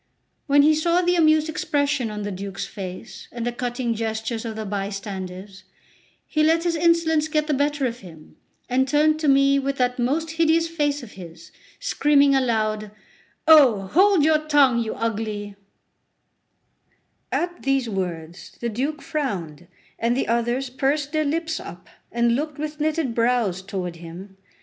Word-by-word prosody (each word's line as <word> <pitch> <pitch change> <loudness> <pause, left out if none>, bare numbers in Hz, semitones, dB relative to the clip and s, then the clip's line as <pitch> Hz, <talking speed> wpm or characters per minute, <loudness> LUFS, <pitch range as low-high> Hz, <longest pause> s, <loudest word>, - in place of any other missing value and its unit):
When 285 0 +5
he 310 +1 +5
saw 340 +3 +2
the 355 0 +2
amused 310 -2 +4
expression 285 -5 -1
on 210 -1 -5
the 205 - -4
Duke's 195 +1 -5
face 190 +2 -8
and 235 -1 -5
the 240 - 0
cutting 240 0 -2
gestures 225 +1 -3
of 225 -1 -5
the 220 0 -5
bystanders, 195 -1 -6 0.6
he 310 - -1
let 325 +2 +3
his 345 -1 0
insolence 320 -2 +2
get 305 -1 0
the 305 - -1
better 285 0 0
of 240 -1 -3
him, 160 -5 -14 0.3
and 260 +2 +1
turned 305 +2 +3
to 310 - -1
me 275 0 +4
with 275 0 -2
that 250 0 0
most 305 +7 0
hideous 330 0 +2
face 290 -4 -1
of 225 - -11
his, 170 -2 -12 0.3
screaming 290 - +3
aloud: 215 -5 0 0.6
"Oh, 275 -10 +7
hold 375 -2 +5
your 310 -1 +4
tongue, 290 -5 +3
you 225 -2 -3
ugly…" 215 -2 -3 1.8
At 350 0 -2
these 270 -2 0
words 175 -4 -5
the 235 - -2
Duke 275 +7 -3
frowned, 175 - -4 0.3
and 235 +2 +1
the - - -1
others 240 +3 -1
pursed 280 +2 -1
their 310 -1 0
lips 325 +2 -2
up 175 +1 -10 0.2
and 235 0 +2
looked 300 +2 -3
with 300 0 -5
knitted 305 -4 0
grows 230 -6 +1
toward 185 -3 -5
him. 175 +4 -11
255 Hz, 160 wpm, -23 LUFS, 210-305 Hz, 1.8 s, Oh